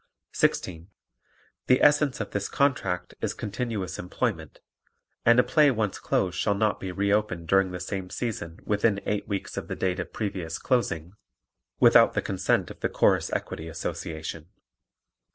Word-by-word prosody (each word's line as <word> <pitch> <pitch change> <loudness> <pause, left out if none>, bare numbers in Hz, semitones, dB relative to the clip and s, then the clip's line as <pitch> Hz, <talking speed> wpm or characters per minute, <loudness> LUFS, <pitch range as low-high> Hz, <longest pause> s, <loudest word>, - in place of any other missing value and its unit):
16. 85 -1 0 0.8
The 125 - +5
essence 145 -2 +4
of 105 - -4
this 100 0 -2
contract 95 -11 0
is - - -2
continuous 105 -4 -4
employment 90 - -3 0.7
and 120 +1 +7
a - - +6
play 150 +1 +4
once 110 -6 -1
closed 90 -2 0
shall 100 +1 +1
not 105 0 +1
be 95 - -5
re 100 +2 +1
opened 95 -6 -1
during 95 +2 +3
the 90 0 -6
same 95 -1 -4
season 90 -9 -4
within 105 -1 +1
eight 105 -1 -2
weeks 100 -2 -4
of - - -4
the - - -4
date 95 0 -1
of 90 - -5
previous 90 -6 -3
closing, 90 -9 -1 0.7
without - - +6
the - - +2
consent - - 0
of - - -12
the - - -1
Chorus - - +2
Equity 80 - -4
Association. 80 -1 -5
100 Hz, 155 wpm, -26 LUFS, 90-110 Hz, 0.8 s, and